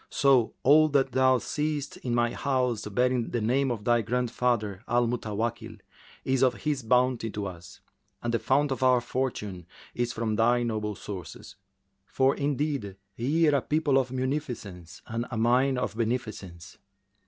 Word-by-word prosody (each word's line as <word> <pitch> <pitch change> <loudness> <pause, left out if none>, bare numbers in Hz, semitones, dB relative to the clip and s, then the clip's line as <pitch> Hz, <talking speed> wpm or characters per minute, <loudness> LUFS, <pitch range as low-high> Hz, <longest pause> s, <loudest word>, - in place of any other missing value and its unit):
So 135 -5 +3
all 155 +3 +6
that 140 -2 +2
thou 130 0 +4
seest 150 +2 -3
in 120 -2 -3
my 120 0 +2
house, 125 -6 -1
bearing 125 +3 0
the 120 - -1
name 130 +5 +1
of 115 -4 -3
thy 120 0 +3
grandfather 120 -3 -1
Al 120 +1 +2
Mutawakkil, 115 -1 -3 0.5
is 130 -1 +1
of 130 -2 +3
his 150 -3 -2
bounty 125 0 +2
to 105 -1 -4
us, 85 -3 -9 0.4
and 120 0 -1
the 115 - +2
fount 135 +6 +1
of 130 - -3
our 130 -1 +5
fortune 105 -8 -4 0.3
is 120 0 -1
from 115 -2 -2
thy 120 +2 +3
noble 105 -3 -2
sources;[FN#374] 95 -4 -11
for 135 +1 +3
indeed 140 -7 -2 0.2
ye 155 +7 +2
are 145 -2 +3
people 150 -2 +2
of 130 -1 -2
munificence 120 - -4
and 115 +2 -4
a 120 - -4
mine 125 +4 +3
of 125 - -2
beneficence." 110 -7 -4
120 Hz, 155 wpm, -27 LUFS, 110-135 Hz, 0.5 s, all